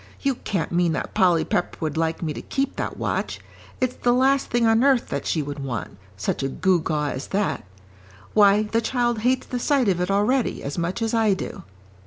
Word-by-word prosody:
"You 275 -1 +1
can't 195 -8 -3
mean 170 -1 +2
that - - -4
Polly 180 -5 +3
Pepper 175 - -1
would 155 -3 -2
like 165 +1 -1
me 155 -2 -2
to - - -6
keep 275 0 -2
that - - -3
watch. - - -2 0.4
It's 255 -1 -1
the 240 - +2
last 270 +2 +3
thing 240 -1 +2
on 225 +2 +4
earth 270 -3 +3
that 140 - -3
she 155 - 0
would 145 +1 -6
want, 125 -7 -5 0.2
such 100 - -2
a 135 - -1
gewgaw 155 -3 +1
as 130 - -5
that. 200 +1 -1 0.7
Why, 205 0 +5
the 225 +2 0
child 240 0 0
hates 250 +3 +1
the 250 - -4
sight 270 -2 +2
of 180 -2 +1
it 180 - -1
already 210 +6 +1
as 140 - -4
much 175 +6 -2
as 225 - -1
I 220 -3 +3
do." - - -6
200 Hz, 210 wpm, -23 LUFS, 160-240 Hz, 0.7 s, Why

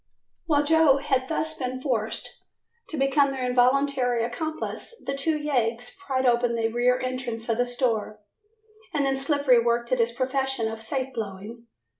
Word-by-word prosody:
While 295 -3 +3
Joe 315 -2 +5
had 265 -2 0
thus 315 +1 -1
been 255 -1 -4
forced 230 -5 -2 0.5
to 315 - -5
become 275 +1 +3
their 265 -2 -3
involuntary 250 -1 +2
accomplice, 315 - -4
the 275 - -2
two 305 +3 0
yeggs 245 -5 -1
pried 270 -9 -2
open 240 -1 +2
the 225 -1 0
rear 245 +2 +2
entrance 255 -3 -4
of 230 +1 0
the 245 - +2
store, 230 -4 -1 0.8
and 285 -2 +2
then 270 0 +1
Slippery 270 -3 +3
worked 235 0 0
at 255 - +2
his 230 0 +2
profession 265 -1 -1
of 225 0 -7
safe 260 +3 -3
blowing. 220 +2 -7
255 Hz, 160 wpm, -25 LUFS, 235-275 Hz, 0.8 s, Joe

